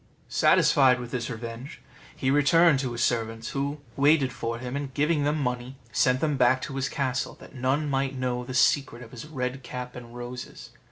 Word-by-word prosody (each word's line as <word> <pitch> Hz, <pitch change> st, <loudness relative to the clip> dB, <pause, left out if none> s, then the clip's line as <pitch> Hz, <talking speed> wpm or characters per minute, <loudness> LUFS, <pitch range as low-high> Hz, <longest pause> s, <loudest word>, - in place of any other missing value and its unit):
Satisfied 130 Hz, -3 st, +4 dB
with 120 Hz, -1 st, -7 dB
this 120 Hz, -3 st, -3 dB
revenge, 115 Hz, +5 st, -7 dB, 0.4 s
he 130 Hz, -1 st, 0 dB
returned 145 Hz, +1 st, +5 dB
to 130 Hz, -2 st, -2 dB
his 120 Hz, 0 st, -1 dB
servants, 115 Hz, -1 st, -1 dB
who 140 Hz, +1 st, -3 dB
waited 140 Hz, -2 st, +3 dB
for 115 Hz, 0 st, -3 dB
him, 125 Hz, +2 st, -5 dB
and 140 Hz, -1 st, -4 dB
giving 150 Hz, 0 st, +2 dB
them 150 Hz, +1 st, +1 dB
money, 125 Hz, -1 st, -3 dB, 0.2 s
sent 125 Hz, +1 st, +2 dB
them 150 Hz, -3 st, +1 dB
back 130 Hz, 0 st, +4 dB
to 135 Hz, -, -5 dB
his 135 Hz, -1 st, -1 dB
castle, 130 Hz, -2 st, -2 dB
that -, -, -14 dB
none 135 Hz, +3 st, 0 dB
might 135 Hz, -1 st, -1 dB
know 125 Hz, -1 st, -1 dB
the 125 Hz, +1 st, -6 dB
secret 130 Hz, -2 st, +2 dB
of 115 Hz, -, -13 dB
his 125 Hz, +4 st, -9 dB
red 130 Hz, -3 st, -3 dB
cap 125 Hz, 0 st, -7 dB
and 120 Hz, -1 st, -10 dB
roses. 125 Hz, +1 st, -8 dB
130 Hz, 190 wpm, -26 LUFS, 125-140 Hz, 0.4 s, returned